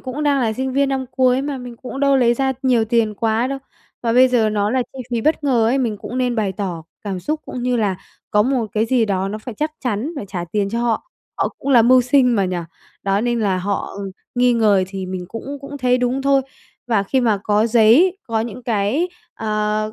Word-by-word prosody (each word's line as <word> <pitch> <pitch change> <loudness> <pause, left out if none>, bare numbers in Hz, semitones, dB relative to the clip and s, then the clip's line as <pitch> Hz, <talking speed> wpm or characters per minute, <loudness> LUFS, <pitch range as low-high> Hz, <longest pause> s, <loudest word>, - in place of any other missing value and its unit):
cũng 265 +3 -5
đang 285 -2 +2
là 225 -3 +1
sinh 260 +3 -3
viên 280 +1 +2
năm 265 -1 -1
cuối 255 0 +2
mà, 280 -2 -3
mình 245 -1 -9
cũng 260 +3 -7
đâu 280 -1 +4
lấy 240 -2 +4
ra 265 +1 0
nhiều 245 -4 +3
tiền 220 -1 +1
quá 225 +3 0
đâu. 275 0 -3 0.4
Mà 230 -1 +1
bây 255 +1 +6
giờ 230 -4 +2
nó 210 0 0
là 255 0 +1
chi 265 - -11
phí 235 -1 0
bất 305 +2 +1
ngờ 245 -5 +3
ấy, 250 +4 +2
mình 230 -5 -1
cũng 250 - -5
nên 250 -1 +1
bày 205 -3 0
tỏ 180 -4 -4 0.2
cảm 190 -3 -3
xúc 305 - -2
cũng 250 - -5
như 250 0 +1
là 205 -5 0 0.3
có 210 - +4
một 250 -1 0
cái 220 +1 +1
gì 245 -1 +2
đó 195 -2 -1
nó 210 +2 -4
phải 230 +2 -8
chắc 305 +6 -2
chắn 245 +7 -1
phải 215 - -5
trả 180 -3 -4
tiền 200 -2 0
cho 235 - -1
họ, 240 - -1 0.3
họ - - +1
cũng 275 - -6
là 240 -3 +7
mưu 255 +2 +6
sinh 250 -2 +3
mà, 195 - +2
nhỉ. 180 -1 -2 0.5
Đó, 195 +1 +1
nên 240 0 0
là 195 -4 +1
họ 200 +1 -3 0.4
nghi 245 0 +3
ngờ 210 -5 +3
thì 190 -1 -5
mình 185 -1 -5
cũng 275 +5 -6
cũng 285 +1 -8
thấy 250 -1 +2
đúng 250 +2 0
thôi. 275 -1 +3 0.4
Và 220 -4 +2
khi 260 +7 0
mà 220 -4 +2
có 210 +1 +2
giấy, 240 - +5
có 225 -2 0
những 235 +2 -5
cái, 235 - 0 0.3
ờ, 215 0 -1
235 Hz, 240 wpm, -20 LUFS, 210-260 Hz, 0.5 s, là